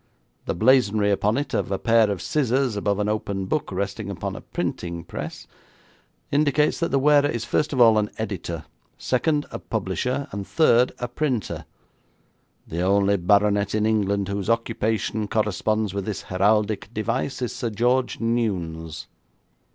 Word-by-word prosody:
The - - -2
blazonry 110 -2 +3
upon 105 +3 +1
it 145 - -3
of - - -1
a 95 - +1
pair 115 -1 +3
of 100 -4 -3
scissors 130 -4 +1
above 100 -1 0
an 105 0 0
open 100 -2 -2
book 145 +7 -2
resting 100 +2 -3
upon 100 - -4
a - - -8
printing 85 -1 -4
press, - - -7 0.9
indicates 150 0 +2
that 170 - 0
the 140 - +2
wearer 145 +1 +5
is 120 -3 -3
first 150 - 0
of 135 - -2
all 115 -3 +7
an 105 0 -1
editor; 85 -7 -4 0.3
second, 145 +3 0
a - - -5
publisher; 125 +6 -2
and 100 0 -5
third, 125 -6 +4
a 125 - -3
printer. 125 -3 -2 1.0
The 85 +2 -3
only 100 +2 +3
baronet 100 +3 +2
in 105 0 +1
England 100 -2 +1
whose 100 +1 -3
occupation 110 -2 0
corresponds 110 -1 0
with 100 -1 -3
this 105 -3 -4
heraldic 105 +2 +1
device 110 +4 -2
is 120 - -2
Sir 120 -4 -3
George 125 +4 +1
Newnes.' 90 -9 -2
110 Hz, 155 wpm, -24 LUFS, 100-125 Hz, 1.0 s, all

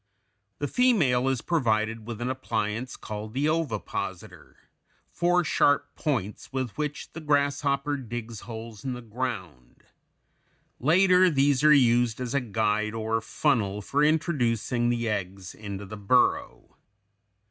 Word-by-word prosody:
The 145 - -2
female 155 - +3
is 130 -3 -1
provided 115 -7 0
with 120 -1 -6
an 120 - -1
appliance 115 -1 -3
called 110 +1 -7
the 140 +3 +1
ovipositor, 155 -9 -3 0.6
four 175 +1 +2
sharp 145 -2 +2
points 120 - -3
with 130 -3 -2
which 150 -1 -4
the 165 - -7
grasshopper 145 -1 +1
digs 115 -3 -6
holes 115 -1 -9
in 130 -2 -2
the 125 0 -8
ground; 105 - -6 1.0
later 180 +5 +5
these 140 -2 +2
are 150 - +7
used 120 -5 +4
as 125 0 -3
a 140 - +2
guide 110 -1 0
or 110 0 -1
funnel 110 -5 0
for 145 +7 +1
introducing 125 - +1
the 120 -1 0
eggs 95 -3 -4
into 100 -2 -7
the 105 +2 -8
burrow. 115 +5 +1
120 Hz, 130 wpm, -27 LUFS, 110-145 Hz, 1.0 s, are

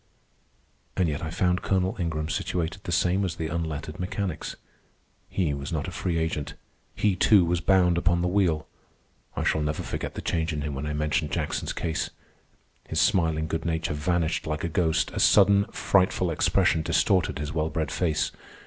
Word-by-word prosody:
And 90 -3 +3
yet 75 -2 -2
I 80 - -3
found 90 +2 +1
Colonel 95 -1 0
Ingram 80 -3 -2
situated 85 +3 -2
the 85 - -3
same 90 +4 +2
as 90 -4 -2
the 80 -2 -3
unlettered 80 -1 -4
mechanics. 90 -2 -3 0.7
He 85 -7 0
was 70 0 -5
not 80 -1 -2
a - - -5
free 85 -1 -2
agent. 80 -3 -2 0.4
He, 105 -3 +2
too, 95 0 +5
was 85 0 0
bound 90 -2 +3
upon 85 0 +1
the - - +2
wheel. 90 -5 +1 0.7
I - - -1
shall 80 - +1
never 75 0 -2
forget - - -4
the - - -4
change 80 -1 -1
in 75 - -3
him 75 0 -3
when 70 +2 -4
I 75 - -2
mentioned 75 0 0
Jackson's - - -2
case. 80 -2 -2 0.8
His - - -1
smiling 80 -3 +2
good 80 0 -3
nature 80 -1 -1
vanished 85 +2 0
like 75 0 -2
a 85 - -1
ghost. 80 -1 +1
A - - -3
sudden, 100 0 +5
frightful 95 -3 +1
expression 80 0 +2
distorted 90 +3 +2
his 75 +1 -4
well 80 0 0
bred 80 -1 -2
face. 80 -4 0
80 Hz, 180 wpm, -26 LUFS, 80-90 Hz, 0.8 s, too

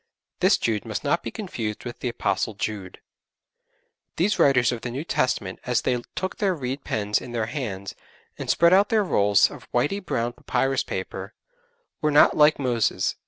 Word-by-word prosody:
This - - +4
Jude 110 -3 -1
must 110 -2 -4
not 155 +4 +1
be - - -5
confused 115 - -5
with 120 - -7
the 125 - -2
Apostle 110 -2 -1
Jude. 100 -3 -5 1.1
These 195 +6 +1
writers 130 -4 +4
of 120 -2 -4
the 120 - -4
New 130 +5 -4
Testament 100 - -1
as 125 -2 0
they 125 -1 0
took 185 0 -3
their 195 -3 +1
reed 135 -1 -4
pens 105 -1 -1
in 120 - -9
their 115 -2 0
hands, 105 -7 -5 0.4
and - - -7
spread 170 +1 +5
out 200 +2 +5
their 220 -2 +3
rolls 105 - +3
of - - -13
whitey 200 +7 0
brown 120 -8 -2
papyrus 135 +1 0
paper, - - -6 0.7
were 150 - +2
not 150 0 +6
like 150 0 +5
Moses. 120 -5 0
125 Hz, 175 wpm, -24 LUFS, 110-150 Hz, 1.1 s, not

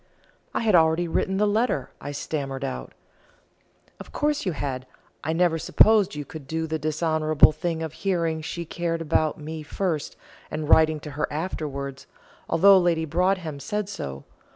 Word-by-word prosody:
"I - - -1
had 220 -3 +2
already 165 0 +4
written 190 +3 0
the 210 - +3
letter," 210 - 0
I 145 - -5
stammered 140 -2 -4
out. 135 -1 -5 1.1
"Of - - -10
course 295 -6 0
you 180 - 0
had: 130 -3 -4 0.4
I 155 - -1
never 165 0 +2
supposed 210 +3 +4
you 145 -1 -5
could 150 -2 -10
do 160 +2 -2
the 160 0 -3
dishonourable 155 0 +3
thing 165 +1 -3
of 160 -2 -5
hearing 165 -4 -1
she 170 +2 -5
cared 165 0 -2
about 155 -1 +1
me 155 +1 -6
first, 160 0 -3 0.3
and 155 0 -4
writing 155 0 +5
to 150 - -8
her 150 +2 -2
afterwards, 145 -4 -4 0.4
although 195 +3 +7
Lady 170 -2 +1
Broadhem 170 -2 0
said 210 +8 -3
so. 70 - -6
160 Hz, 160 wpm, -25 LUFS, 150-175 Hz, 1.1 s, although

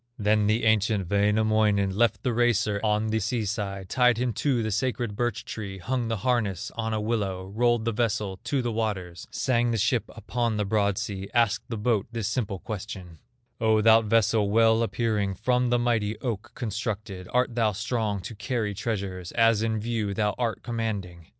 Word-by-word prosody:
Then 105 -1 +2
the 110 +2 +2
ancient 110 -3 +2
Wainamoinen 105 -1 +2
Left 115 0 +2
the 125 - 0
racer 110 -3 +2
on 105 0 +1
the 110 - +1
sea 110 +2 -1
side, 100 -2 -3
Tied 125 +2 +3
him 125 -1 0
to 125 -3 0
the 110 - -2
sacred 120 -1 -1
birch 120 0 -2
tree, 100 -3 -6
Hung 120 +5 -2
the 115 -1 -1
harness 110 -8 0
on 110 -1 -2
a 110 - 0
willow, 100 -4 -2
Rolled 120 0 +2
the 115 - +1
vessel 105 -4 -1
to 130 +1 0
the 120 - -1
waters, 95 -6 -3
Sang 120 -3 +1
the 115 - 0
ship 110 +3 +1
upon 115 0 -2
the 105 - 0
broad 100 -1 +1
sea, 100 -2 -4
Asked 115 -4 +2
the 115 - -3
boat 105 -1 +1
this 115 -4 -2
simple 105 -3 -2
question: 95 -4 -7 0.4
"O 110 -1 +3
thou 110 +1 +6
vessel, 110 -1 +2
well 115 +1 +4
appearing 110 -4 0
From 125 +3 +1
the 120 - +3
mighty 115 -3 0
oak 115 -6 -4
constructed, 105 -4 -4
Art 125 -1 +1
thou 115 -2 +2
strong 110 -1 -2
to 95 - -7
carry 105 0 -2
treasures 95 -4 -4
As 115 -2 +4
in 110 -1 0
view 110 -2 -2
thou 105 -1 +1
art 115 -2 -1
commanding?" 100 -8 -4
110 Hz, 180 wpm, -26 LUFS, 100-115 Hz, 0.4 s, thou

